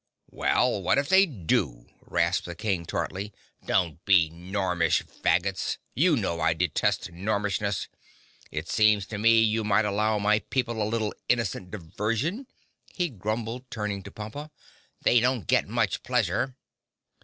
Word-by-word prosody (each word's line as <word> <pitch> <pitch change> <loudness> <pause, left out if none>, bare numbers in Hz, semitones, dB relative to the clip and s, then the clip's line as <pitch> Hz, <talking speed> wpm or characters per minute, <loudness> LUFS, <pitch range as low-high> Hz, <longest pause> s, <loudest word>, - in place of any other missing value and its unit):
"Well, - - +1
what - - +2
if 140 +1 0
they 190 +1 +6
do?" 80 - -1 0.2
rasped 85 +2 0
the 85 - -6
King 95 -3 -2
tartly. 100 +3 -3 0.3
"Don't 85 -3 0
be 90 -6 +5
gormish 90 +1 0
Faggots. 95 +2 0 0.2
You 165 +3 +3
know 90 -8 -2
I 80 - +2
detest 85 -1 0
gormishness. 100 +1 -1 0.6
It 75 +2 -5
seems 105 -3 +3
to 105 0 -6
me 115 +1 +5
you 110 0 +1
might 105 +1 +3
allow 105 +1 +1
my 105 +1 +3
people 120 -2 -2
a 105 - 0
little 110 -2 -1 0.2
innocent 115 -6 0
diversion," 110 - -3 0.4
he 175 -2 -1
grumbled, 115 +3 -4
turning 105 -3 -3
to 100 - -10
Pompa, 110 +10 -7 0.5
"they 120 - +5
don't 125 -2 +1
get - - +2
much - - 0
pleasure!" 130 -1 0
105 Hz, 145 wpm, -27 LUFS, 95-115 Hz, 0.6 s, they